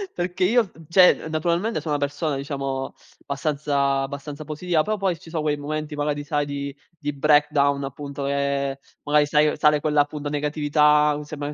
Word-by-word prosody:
perché 180 +1 -2
io, 235 +4 +4
v 165 -5 -15
cioè, 180 -2 +5
naturalmente 170 +6 0
sono 150 0 -3
una 145 - -1
persona, 145 +1 -2
diciamo, 135 -1 -4 0.3
abbastanza- 140 -1 0
abbastanza 140 +2 -6
positiva, 160 +1 0
però 215 +5 -1
poi, 190 -4 -1
ci 165 - -14
so' 160 -1 -2
quei 150 -1 0
momenti, 155 +1 -4
magari, 145 0 -2
sai 145 -1 0
di 140 -1 -5 0.2
di 145 -2 -3
breakdown 145 -1 +3
appunto, 140 +1 -6
che, 140 -1 -1 0.2
magari 150 0 +3
sai, 150 0 +3
sale 150 -1 +4
quella, 150 -1 +2
appunto, 145 0 -4
negatività, 150 0 +2
sembra 145 -1 -5
che - - -6
150 Hz, 170 wpm, -23 LUFS, 140-155 Hz, 0.3 s, cioè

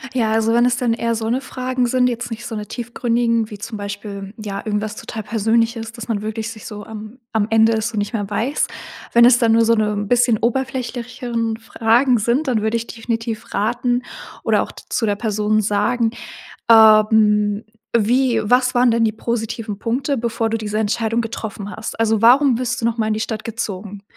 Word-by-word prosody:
Ja, 225 -3 +1
also 225 +1 +2
wenn 240 +1 +4
es 245 - +2
dann 240 -2 +1
eher 230 0 -1
so 225 0 -2
'ne 250 +3 +1
Fragen 255 -2 -2
sind, 250 +1 +2
jetzt 240 0 -4
nicht 230 +1 -6
so 225 - -5
'ne 210 0 -4
tiefgründigen, 235 -1 -1
wie 205 - -8
zum 215 +1 -6
Beispiel, 200 0 -6
ja 200 -1 -5
irgendwas 210 0 -2
total 220 - -6
Persönliches, 225 +1 0
dass 230 -1 -9
man 210 -2 -2
wirklich 220 +1 -4
sich 215 -2 -11
so 210 -1 -7
am 220 +3 -9
am 215 -2 +1
Ende 225 0 +5
es 220 +1 0
so 225 - -7
nicht 205 +3 -2
mehr 205 -3 -2
weiß. 235 +8 -1 0.5
Wenn 235 0 +7
es 245 0 +6
dann 230 -2 +3
nur 230 0 +4
so 230 - +4
'ne 210 -1 0
bisschen 240 -1 +3
oberflächigere 240 -2 -2
Fragen 235 +3 +2
sind, 240 +8 0
dann 235 -5 +1
würde 220 +1 +1
ich 230 - -5
definitiv 225 -1 -4
raten 245 +4 0 0.4
oder - - +2
auch - - -9
zu 225 - -3
der 205 -1 +1
Person 215 0 0
sagen: 220 +3 +1 0.6
„Ähm, 215 -1 +5 0.3
wie 240 +2 +2
was 250 +3 +3
waren 245 0 +4
denn 230 0 +2
die 220 - +2
positiven 225 -2 -4
Punkte, 255 +5 -1
bevor 225 -1 -1
du 225 - 0
diese 215 -1 -3
Entscheidung 220 +2 0
getroffen 220 -3 -5
hast? 220 +1 -6
Also 220 -1 +2
warum 255 +2 +6
bist 245 -1 -2
du 230 - -2
noch 230 0 0
mal 220 -1 0
in 215 - +1
die 215 - -2
Stadt 220 -1 -3
gezogen? 205 -3 -5
225 Hz, 200 wpm, -20 LUFS, 215-240 Hz, 0.6 s, Wenn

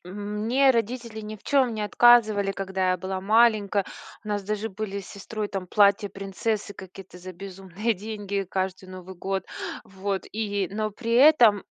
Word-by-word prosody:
мне 210 +8 +1
родители 235 -1 -2
ни 215 0 -7
в - - -25
чём 260 -5 +2
не 215 - -4
отказывали, 215 -3 +4
когда 190 -1 -1
я 185 - +1
была 190 +1 -4
маленькая. 210 -1 +3 0.4
У - - -8
нас 205 -1 -1
даже 210 +2 -3
были 200 -1 -5
с 195 - -12
сестрой 210 +1 -5
там 195 -2 -5
платья 205 +1 +3
принцессы 200 +2 -3
какие-то 190 -1 -12
за 185 +1 -9
безумные 195 +4 -4
деньги 200 -1 -4
каждый 190 0 -3
Новый 185 0 -9
год. 190 +1 -3 0.4
Вот. 195 0 -4
И 205 -3 -2
но 215 +1 -2
при 230 +2 -4
этом 240 -6 +6
205 Hz, 165 wpm, -25 LUFS, 190-220 Hz, 0.4 s, этом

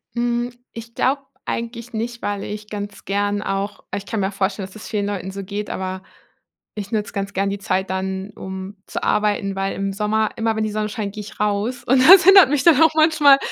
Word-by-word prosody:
Hm, 240 0 -1 0.2
ich 230 0 -10
glaube 275 +3 +1 0.2
eigentlich 235 +1 -5
nicht, 235 +2 -4
weil 205 -1 -2
ich 210 0 -7
ganz 205 -1 -7
gern 205 +1 -1
auch 200 0 -3
ich 200 0 -5
kann 220 - -2
mir 195 +1 -1
vorstellen, 195 0 -2
dass 190 - -16
das 215 - -9
vielen 205 -2 -1
Leuten 190 -2 -4
so 195 +1 -6
geht, 205 +2 -5
aber 185 0 -4 0.7
ich 205 0 -6
nutze 210 -1 -1
ganz 200 -1 -3
gern 195 +1 0
die 200 - -3
Zeit 190 -1 -1
dann, 190 +1 -3
um 190 +1 -7
zu - - -5
arbeiten, 205 -2 0
weil 195 0 -1
im 195 0 -2
Sommer, 215 +1 0
immer 225 -1 0
wenn 220 - 0
die 215 - -2
Sonne 215 0 -2
scheint, 205 -2 -4
gehe 210 - -5
ich 210 - -12
raus 210 +4 -1
und 260 +2 +4
das 380 -1 +10
hindert 385 -7 +8
mich 285 -3 +1
dann 325 -3 +6
auch 320 - +7
manchmal 310 -3 +6
210 Hz, 220 wpm, -21 LUFS, 195-235 Hz, 0.7 s, das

